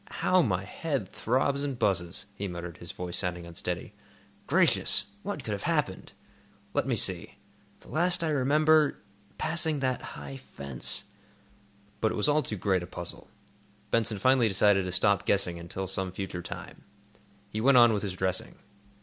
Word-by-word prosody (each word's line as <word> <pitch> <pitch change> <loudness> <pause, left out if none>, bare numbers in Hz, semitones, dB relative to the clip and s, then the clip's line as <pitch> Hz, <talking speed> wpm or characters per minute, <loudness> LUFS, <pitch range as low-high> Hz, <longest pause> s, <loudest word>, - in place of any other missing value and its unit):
"How 185 0 +5
my 95 - 0
head 135 - -3
throbs 135 +4 0
and 140 -3 -2
buzzes!" 90 -5 0
he 100 0 -4
muttered, 85 -2 -6
his 85 - -6
voice 90 -1 -5
sounding 90 -2 -3
unsteady. 85 -1 -5 0.5
"Gracious! - - +3 0.2
What - - -4
could - - -4
have - - -2
happened? - - -1 0.6
Let - - +1
me - - +1
see. - - +1 0.5
The - - -17
last 175 +2 +3
I 165 - +1
remember—passing 150 0 +1
that 130 -2 0 0.2
high 70 -1 -7
fence—" 70 -2 -3 1.0
But 110 - +1
it - - -4
was 105 - +1
all 150 +1 +4
too 105 - -4
great 95 -1 +1
a 85 - -6
puzzle. 85 -1 -7 0.6
Benson 110 -2 +2
finally 130 +3 +4
decided 95 -1 +3
to 90 - -3
stop 100 +1 +3
guessing 90 -4 +1
until 90 +3 -5
some 95 0 -3
future 95 -1 -5
time. - - -8 0.7
He 110 - -2
went 135 +2 +6
on 120 -2 +7
with 105 - 0
his 100 -3 -3
dressing. 95 0 -1
100 Hz, 160 wpm, -29 LUFS, 90-135 Hz, 1.0 s, on